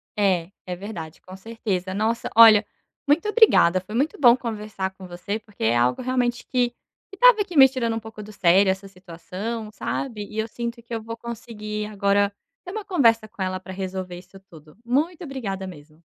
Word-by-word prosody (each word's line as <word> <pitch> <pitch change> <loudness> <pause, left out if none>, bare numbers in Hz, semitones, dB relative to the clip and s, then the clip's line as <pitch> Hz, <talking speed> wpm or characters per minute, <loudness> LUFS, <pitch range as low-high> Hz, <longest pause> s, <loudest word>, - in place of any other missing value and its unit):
É, 190 -4 +1
é 180 -1 -4
verdade, 175 -5 -8
com 185 +1 -12
certeza. 190 -3 -4
Nossa, 220 +3 -1
olha, 220 -2 +8 0.4
muito 315 +8 +2
obrigada, 415 - +5
foi 210 +4 -9
muito 285 +6 0
bom 245 -3 +7
conversar 210 -5 -4
com 190 -1 -12
você, 180 +5 -5
porque 210 - -10
é 115 +2 +3
algo, 125 - +1
realmente, 245 -1 -1
que 245 -2 0 0.4
que 390 - -11
estava - - +6
aqui 380 -5 -3
me 265 -1 +8
tirando 235 -4 -2
um 225 - -4
pouco 220 -1 -10
do 210 +1 -11
sério 190 +2 +4
essa 190 +1 -1
situação, 195 +5 -7
sabe, 215 -1 -4
e 215 - -9
eu 220 - 0
sinto 235 +1 -6
que 235 - -9
eu 225 - -2
vou 230 +1 -7
conseguir 215 -2 -6
agora 200 -1 +1 0.3
ter 360 - -7
uma 435 -1 -4
conversa 230 - +2
com 210 - -11
ela 185 0 -2
para 190 - -10
resolver 185 -1 -5
isso 185 +2 -14
tudo. 155 -5 -17
Muito 315 +8 0
obrigada 210 - -5
mesmo. 155 -2 -13
210 Hz, 195 wpm, -23 LUFS, 190-235 Hz, 0.4 s, olha